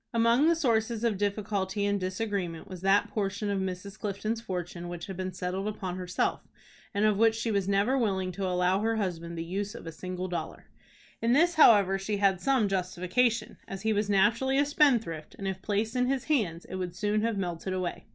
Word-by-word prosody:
Among 230 +6 +4
the 335 - +4
sources 230 -6 0
of 220 -5 +1
difficulty 200 -1 -1
and 205 0 +1
disagreement 185 -3 -3
was 185 -3 -8
that 195 +1 +3
portion 205 0 -2
of 200 - 0
Mrs. 190 +2 -5
Clifton's 215 +2 -2
fortune 175 -4 -5
which 175 0 -6
had 190 - -6
been 185 +1 -3
settled 185 +2 -3
upon 190 -4 -4
herself, 180 -1 -1 0.5
and 205 +1 +1
of 210 -2 +3
which 225 +1 +4
she 225 0 -1
was 200 -2 0
never 200 +6 +2
willing 190 -7 0
to 190 +1 -3
allow 180 +1 +2
her 225 +2 0
husband 170 -5 -3
the 165 - -2
use 200 +5 -4
of - - -9
a 165 - -5
single 185 +2 -5
dollar. 175 -1 -5 0.6
In 230 +1 +3
this, 340 +6 +4
however, 200 - +6
she 205 +2 -2
had 195 -2 +2
some 265 -6 +2
justification, 195 +5 0
as 195 +1 -7
he 220 0 +2
was 210 0 0
naturally 225 +7 +3
a 285 - +4
spendthrift, 235 - +1
and, 195 - -5
if 190 -1 -3
placed 215 +4 -1
in 250 0 +2
his 265 -1 0
hands, 205 - 0
it 185 - -6
would 180 -2 -4
soon 210 +3 0
have 225 -1 0
melted 180 -1 -3
away. 185 -2 -3
200 Hz, 205 wpm, -29 LUFS, 185-225 Hz, 0.6 s, however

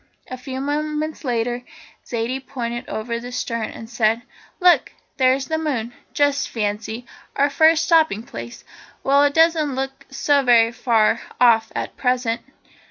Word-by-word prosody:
A - - -3
few 260 +1 -6
moments 300 +2 -2
later 240 -1 -1 0.5
Zaidie 245 +3 -2
pointed 240 -2 -5
over 235 +2 -3
the 245 +1 -8
stern 230 -2 -3
and 225 - -9
said: 225 0 +1 0.4
"Look, 360 -2 +4 0.2
there's 260 0 +3
the 315 +3 -2
moon! 245 -7 -2 0.2
Just 285 -1 +1
fancy 220 +2 -3 0.3
our 280 +1 +2
first 320 +3 +4
stopping 315 - +3
place! 120 - -9 0.4
Well, 280 +1 +4
it 285 - 0
doesn't 320 -4 +3
look 270 0 -5
so 280 +1 +2
very 235 -3 +5
far 230 -2 +2 0.2
off 225 -2 +4
at - - -4
present." 250 -2 0
255 Hz, 145 wpm, -21 LUFS, 230-285 Hz, 0.5 s, very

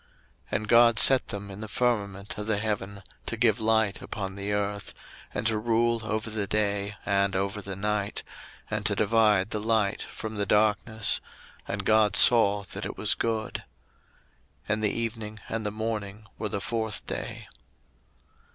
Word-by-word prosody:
01:001:017 - - -33 0.5
And 110 - -7
God 115 0 +6
set 130 +4 +6
them 100 0 -6
in 95 +2 -8
the 110 - -5
firmament 100 -4 -1
of 105 - -5
the 110 -2 +1
heaven 100 -2 -3 0.2
to 115 - -3
give 110 -2 +3
light 110 -2 +2
upon 95 -2 -5
the 100 +1 -4
earth, 100 0 -2
01:001:018 - - -20 0.3
And 105 - -2
to 110 -1 +2
rule 115 +1 +1
over 110 +1 -2
the 105 -2 -2
day 100 0 0
and 100 -1 +1
over 100 +2 -1
the 100 -1 -6
night, 105 +1 -2 0.5
and - - -2
to - - +1
divide 105 -3 +3
the 105 - -1
light 110 -2 0
from 110 -1 -6
the 100 -1 -1
darkness: 110 +1 +2 0.5
and - - -3
God 110 -2 +4
saw 105 -4 +6
that - - -5
it - - -8
was - - +3
good. 110 -1 -2 1.0
01:001:019 - - -38
And 110 +1 -2
the 105 - +4
evening 110 -2 -4
and 110 -1 -3
the - - 0
morning 110 -1 -4
were 110 - -2
the 100 - -2
fourth 110 +1 -3
day. - - -5
105 Hz, 175 wpm, -27 LUFS, 100-110 Hz, 1.0 s, God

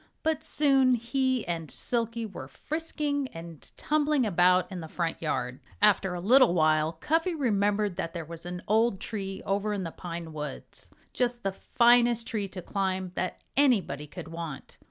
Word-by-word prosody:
But 315 -1 0
soon 270 -5 +4
he 260 +1 0
and 165 -3 -3
Silkie 230 -1 -2
were 180 -11 -8
frisking 295 - -2
and 165 -2 -10
tumbling 300 -3 +1
about 180 -1 +3
in 185 - -5
the 160 - -7
front 165 0 -3
yard. 125 -5 -2 0.2
After 195 -3 +3
a - - -4
little 235 +1 +5
while 155 -1 +3
Cuffy 325 - 0
remembered 205 - +1
that 165 - -2
there 170 -2 -5
was 165 +1 -9
an 180 0 -6
old 220 -1 +2
tree 195 -3 -5
over 200 +2 0
in 200 -2 -2
the 165 - -4
pine 170 -2 -7
woods 150 -3 -7 0.2
just 245 -1 -1
the 195 - 0
finest 235 +3 +3
tree 210 -4 -2
to 185 -2 -8
climb 190 -2 -2
that 185 - -3
anybody 195 - +2
could 160 - -9
want. 165 -4 -7
195 Hz, 165 wpm, -28 LUFS, 170-245 Hz, 0.2 s, little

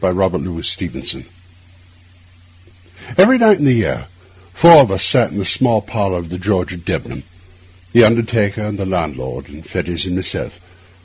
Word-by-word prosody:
THE 95 - +1
BODY 90 -2 -2
SNATCHER - - -3 1.9
EVERY 240 +8 +6
night 220 -4 +4
in 145 - 0
the 130 - +4
year, 115 -4 -2 0.4
four 165 - +7
of 135 -7 +6
us 95 0 0
sat 110 +5 +3
in - - -8
the 100 - -3
small 115 -3 +2
parlour 100 -4 -3
of 85 -2 -8
the 90 +1 -7
George 95 -2 -2
at 85 -1 -12
Debenham—the 90 +3 -3
undertaker, 110 -2 +1
and 105 -1 -5
the 100 - -3
landlord, 75 -8 -5
and 75 +3 -14
Fettes, 85 +2 -3
and 90 - -3
myself. 90 -1 -5
95 Hz, 160 wpm, -16 LUFS, 90-115 Hz, 1.9 s, four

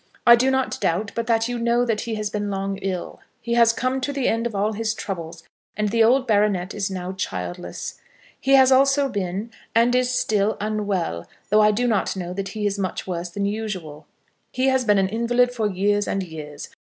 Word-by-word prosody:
I 235 - +9
do 255 +3 +2
not 265 -1 -1
doubt 195 +5 0
but 230 -1 -3
that 225 -1 +2
you 245 -1 -3
know 235 +1 +2
that 225 -3 0
he 230 -2 -3
has 210 -1 -3
been 205 -1 -2
long 195 0 -2
ill. 190 -2 -4 0.2
He 235 - -3
has 235 -1 +5
come 255 +3 -1
to 285 - -2
the 275 -3 -1
end 230 +1 +1
of 225 - -8
all 210 +2 0
his 215 +1 -2
troubles, 170 -5 -6 0.3
and 210 0 0
the 230 +2 +3
old 255 +4 +4
baronet 205 -4 +1
is 200 -1 -2
now 185 -1 -4
childless. 90 - -5 0.4
He 270 0 +4
also 270 +2 +5
has 275 - -2
been, 200 +3 -3 0.2
and 235 +2 +4
is 250 0 +2
still, 215 -4 +1
unwell, 200 - -2 0.2
though 215 +1 +6
I 210 - +6
do 235 +4 +1
not 210 -5 0
know 180 -1 -5
that 195 +1 -4
he 215 -1 -4
is 200 0 -1
much 185 -2 -3
worse 175 -1 -4
than 200 +3 -3
usual. 185 -8 -5 0.4
He 260 +1 +1
has 260 -1 +1
been 210 -2 +4
an 195 -1 +3
invalid 240 +4 +1
for 220 -4 0
years 205 +2 +1
and 195 - -1
years. 150 -4 -8
210 Hz, 215 wpm, -23 LUFS, 190-235 Hz, 0.4 s, I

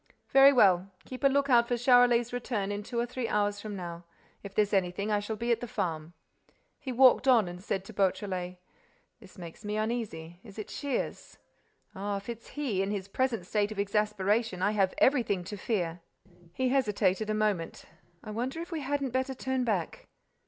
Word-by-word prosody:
"Very 275 +1 +8
well. 195 -7 +4 0.2
Keep 255 +2 -9
a - - +7
lookout 270 -4 +3
for 245 - 0
Charolais's 245 -1 +4
return 230 -5 -2
in 205 0 -3
two 235 +3 -4
or 235 - +1
three 245 0 -4
hours 205 -1 0
from 210 -1 -6
now. 175 -2 -7 0.4
If 200 -1 -10
there's 210 -1 +2
anything, 195 +2 0
I 210 - +2
shall 205 +2 -4
be 235 +3 -2
at 230 - +2
the 245 - -6
farm." 165 -5 -3 0.7
He 265 - -5
walked 255 +1 +5
on 235 -7 +5
and 175 +1 -8
said 195 -2 -2
to 225 - -10
Beautrelet: 185 -2 -1 0.6
"This 195 -5 -16
makes 170 +3 -10
me 210 0 -3
uneasy—is 200 -5 -4
it 215 - -6
Shears? 280 -4 -4 0.6
Ah, 200 +1 -3
if 200 +3 -9
it's 230 -1 -7
he, 245 -10 0
in 195 - -1
his 200 -2 -3
present 230 -2 -1
state 210 +2 0
of 215 - -7
exasperation, 210 0 0
I 205 - +3
have 195 -3 +1
everything 230 -9 +2
to 195 +4 -7
fear!" 180 -5 -2 0.5
He 255 +8 0
hesitated 215 -5 +1
a 215 - +1
moment: 210 -6 -1 0.4
"I 215 - -7
wonder 250 +8 -3
if 340 +2 -7
we 325 - -2
hadn't 280 -2 -2
better 260 +1 -1
turn 260 0 -1
back. 200 -8 -2
210 Hz, 190 wpm, -29 LUFS, 195-245 Hz, 0.7 s, Very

